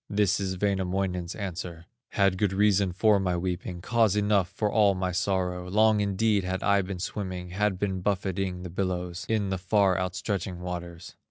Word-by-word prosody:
This 100 -2 +2
is 95 -2 -2
Wainamoinen's 95 -2 -1
answer: 90 -4 -6 0.3
"Had 95 -2 +2
good 100 -3 +1
reason 100 -1 +3
for 105 +3 +3
my 90 -2 0
weeping, 90 0 -4
Cause 115 -1 +2
enough 105 -3 +2
for 105 -1 -1
all 105 -3 +4
my 95 0 -1
sorrow; 90 -1 -1
Long 110 +2 +4
indeed 100 0 +1
had 95 +1 -3
I 100 -1 +4
been 95 0 -5
swimming, 90 -1 -5
Had 100 0 0
been 95 -1 -2
buffeting 95 -1 -1
the 90 - -7
billows, 90 -1 -3
In 105 -3 +1
the 95 - -1
far 95 0 +2
outstretching 90 0 -3
waters. 85 -1 -6
95 Hz, 170 wpm, -27 LUFS, 90-100 Hz, 0.3 s, all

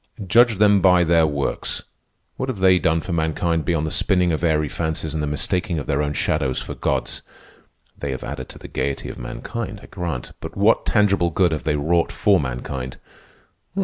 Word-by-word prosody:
"Judge 115 +3 +5
them 105 -1 +5
by 90 -1 +5
their 85 -1 +4
works. 70 -2 -2 0.5
What 130 - -3
have 125 - -3
they 95 -1 +5
done 80 0 +1
for 90 - -4
mankind 80 0 0
beyond 80 -3 0
the 80 - -3
spinning 90 -3 +2
of 80 - -2
airy 75 -2 +2
fancies 80 0 -3
and 80 - -2
the 75 - -1
mistaking 85 +4 -1
of 75 - -3
their 70 -1 0
own 75 0 -1
shadows 70 -4 0
for - - -6
gods? - - -2 0.7
They 70 - -5
have 65 -1 -4
added 65 - -6
to - - -11
the - - -10
gayety 70 -1 -3
of - - -8
mankind, 105 - -5
I - - -11
grant; 85 -9 -5
but - - -8
what 105 +3 +3
tangible 100 -5 +3
good 90 +1 +2
have 75 - -3
they 75 -1 +1
wrought 85 +4 +1
for 100 -3 +3
mankind? 65 -1 -4
80 Hz, 195 wpm, -22 LUFS, 75-95 Hz, 0.7 s, Judge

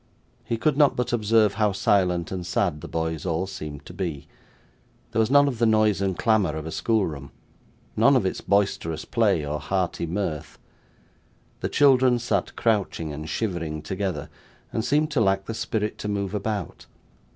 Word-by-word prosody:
He 115 - -2
could 145 +4 +1
not 145 -2 +5
but 125 -1 -2
observe 110 -2 +3
how 105 -1 +1
silent 90 -3 +1
and 95 -2 -3
sad 90 -3 -1
the - - -7
boys 80 0 -3
all 90 0 -1
seemed 75 -7 -8
to - - -10
be. 80 -6 -4 0.8
There 115 - 0
was 110 0 +3
none 145 +1 +6
of 125 -5 -3
the 115 - +4
noise 110 -2 +3
and 95 -3 -1
clamour 105 -9 +2
of 80 -1 -5
a 80 - -5
schoolroom; 80 - -1 0.7
none 115 +6 +5
of 120 -7 +2
its 95 - -2
boisterous 100 -5 0
play, 100 -10 +1
or 75 +1 -3
hearty 90 -2 -2
mirth. 85 -3 -3 1.0
The - - -2
children 130 -3 +4
sat 115 -6 -1
crouching 100 -8 0
and 75 +2 -6
shivering 85 -6 -3
together, 95 -3 -3 0.4
and 110 - -1
seemed 150 +5 +1
to 140 -6 +1
lack 95 -2 +2
the 115 - -4
spirit 110 -2 -2
to - - -4
move 100 -1 -2
about. 105 -3 -4
100 Hz, 175 wpm, -25 LUFS, 85-115 Hz, 1.0 s, none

